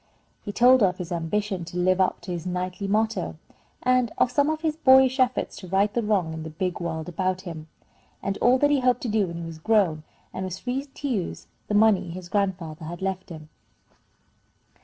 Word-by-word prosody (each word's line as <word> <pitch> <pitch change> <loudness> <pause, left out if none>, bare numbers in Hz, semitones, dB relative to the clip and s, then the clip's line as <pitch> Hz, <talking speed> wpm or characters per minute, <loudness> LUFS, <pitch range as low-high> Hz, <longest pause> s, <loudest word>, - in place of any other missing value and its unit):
He 205 - -5
told 250 +4 +5
her 200 - +6
of 180 0 -3
his 180 -1 -6
ambition 185 +3 -2
to 175 - -7
live 185 +1 +3
up 185 - +1
to 185 - -7
his 175 0 -4
knightly 180 +2 -3
motto, 220 +3 0 0.5
and 255 -2 +2
of 245 - +3
some 285 +4 +2
of 315 0 -2
his 315 -2 0
boyish 265 -3 +5
efforts 255 0 +1
to 185 - -9
right 195 +3 +2
the 240 - +1
wrong 200 -7 0
in 160 - -6
the 160 - -6
big 180 +3 -3
world 160 -2 -4
about 185 +1 -1
him, 165 -4 -8 0.6
and 195 - -1
all 250 +2 +5
that 290 +2 +3
he 285 - +3
hoped 250 -1 +2
to - - -3
do 210 -3 +1
when 170 0 -6
he 170 - -5
was 165 -1 -8
grown, 185 -5 +2 0.3
and 190 - -4
was 185 -1 -4
free 260 +3 -3
to 285 +1 -7
use 210 -10 -3 0.2
the 210 - -1
money 210 -4 +4
his 175 +1 -8
grandfather 180 -6 -2
had 175 +3 -7
left 190 0 -3
him. 155 -2 -10
190 Hz, 215 wpm, -25 LUFS, 175-240 Hz, 0.6 s, her